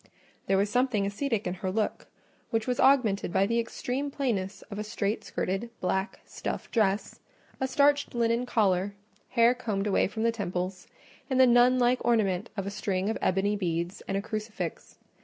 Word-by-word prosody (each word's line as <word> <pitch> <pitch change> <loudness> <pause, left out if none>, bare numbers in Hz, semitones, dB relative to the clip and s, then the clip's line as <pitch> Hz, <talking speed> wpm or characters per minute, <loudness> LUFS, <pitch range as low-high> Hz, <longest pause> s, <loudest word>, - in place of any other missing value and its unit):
There 195 - +3
was 200 +1 +1
something 245 -5 +2
ascetic 215 +2 -1
in 180 - -1
her 190 - -1
look, 215 +2 -2 0.4
which 225 -2 0
was 250 -1 -1
augmented 230 -10 +3
by 195 - +3
the 230 +3 +1
extreme 250 +4 -3
plainness 220 -9 -2
of 205 - -5
a - - -2
straight 210 0 -2
skirted, 195 +6 -2
black, 190 +2 -2
stuff - - -5
dress, 210 -3 0 0.4
a 265 - 0
starched 285 0 +2
linen 235 +1 +1
collar, 200 -3 +1 0.3
hair 235 0 +4
combed 215 -5 -2
away 205 - +2
from 220 +3 -4
the 230 - +3
temples, 185 -3 -4 0.4
and 260 -1 +1
the 260 - +8
nun 245 +1 +5
like 250 0 +2
ornament 210 -4 +1
of 195 - -2
a 200 - -3
string 195 0 -1
of - - -3
ebony 195 +3 +1
beads 170 -2 -2
and 195 - -1
a 200 - -2
crucifix. 215 0 -5
215 Hz, 175 wpm, -28 LUFS, 195-240 Hz, 0.4 s, the